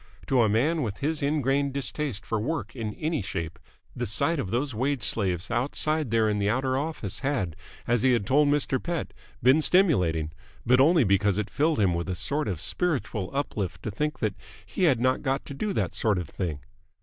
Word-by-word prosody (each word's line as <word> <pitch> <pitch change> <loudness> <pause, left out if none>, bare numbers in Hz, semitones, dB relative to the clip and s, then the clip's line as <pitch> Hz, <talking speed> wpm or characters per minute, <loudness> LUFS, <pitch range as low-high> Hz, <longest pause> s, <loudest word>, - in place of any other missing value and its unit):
To 130 -2 +3
a 110 - +3
man 145 +10 +2
with 105 -6 -3
his 155 +2 -1
ingrained 140 -1 +1
distaste 135 -5 -2
for 115 - -1
work 120 -2 -3
in 110 -4 -4
any 155 0 -1
shape 85 -3 -5 0.4
the - - -2
sight 145 - +1
of 100 - -3
those 130 +5 -1
wage 130 +2 -1
slaves 95 -3 0
outside 145 +4 +1
there 110 -1 +2
in 105 -1 0
the 100 0 +1
outer 130 +3 0
office 135 - -3
had, 125 - -1 0.3
as 120 -1 +1
he 130 0 +4
had 115 -5 +1
told 145 +5 +4
Mr. 145 -2 +1
Pett, 170 -1 -3 0.3
been 130 +5 +6
stimulating: 90 - +2 0.3
but 125 +2 +4
only 155 +2 +5
because 100 -1 +2
it 105 -1 -2
filled 155 0 +1
him 95 -4 +3
with 85 +2 -3
a 95 - -1
sort 145 - -1
of 90 -6 -2
spiritual 110 - -2
uplift 100 - -3
to 110 - -3
think 150 +8 -2
that 110 -2 -1 0.3
he 140 - 0
had 135 -8 +3
not 130 +1 +1
got 135 -1 -1
to - - -7
do 205 +9 -2
that - - -1
sort 105 -4 +1
of 90 -3 -3
thing. 80 -6 -4
125 Hz, 205 wpm, -27 LUFS, 100-145 Hz, 0.4 s, been